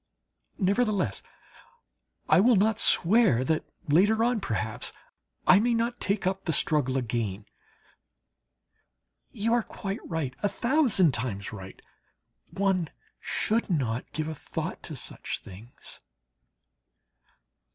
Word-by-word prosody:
Nevertheless, 200 - +1 1.1
I 155 - +5
will 235 +4 +5
not 215 +2 +2
swear 185 - +5
that 155 +4 0 0.2
later 205 +9 +4
on, 240 -1 +1
perhaps, 110 - -3 0.5
I 190 - +7
may 235 +2 +2
not 235 +1 -1
take 200 -1 0
up 190 +1 -1
the 165 - 0
struggle 135 -3 +2
again. 110 -5 -2 1.9
You 225 +3 0
are 240 - +3
quite 200 -1 -6
right, 160 -7 -2
a 205 - +1
thousand 235 - +3
times 110 -4 -3
right! 95 -2 -9 0.7
One 190 -4 0 0.3
should 225 +1 -1
not 125 -8 -1
give 155 -1 -3
a 160 - -3
thought 150 - -5
to - - -7
such - - -5
things. 105 +7 -8
185 Hz, 115 wpm, -27 LUFS, -, 1.9 s, I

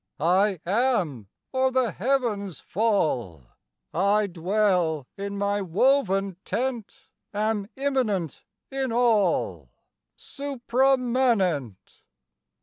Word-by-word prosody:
I 185 +4 +2
am, 185 - 0 0.2
or 260 0 +2
the 255 -4 +1
heavens 210 - -1
fall! 155 - 0 0.5
I 200 +4 +2
dwell 180 -4 0
in 200 0 -5
my 200 0 0
woven 195 -1 +1
tent, 245 -3 -4 0.3
Am 210 -1 0
immanent 250 - -1 0.3
in 270 -2 -2
all, 200 - +1 0.5
Suprámanent! 245 - 0
205 Hz, 80 wpm, -25 LUFS, 180-250 Hz, 0.5 s, I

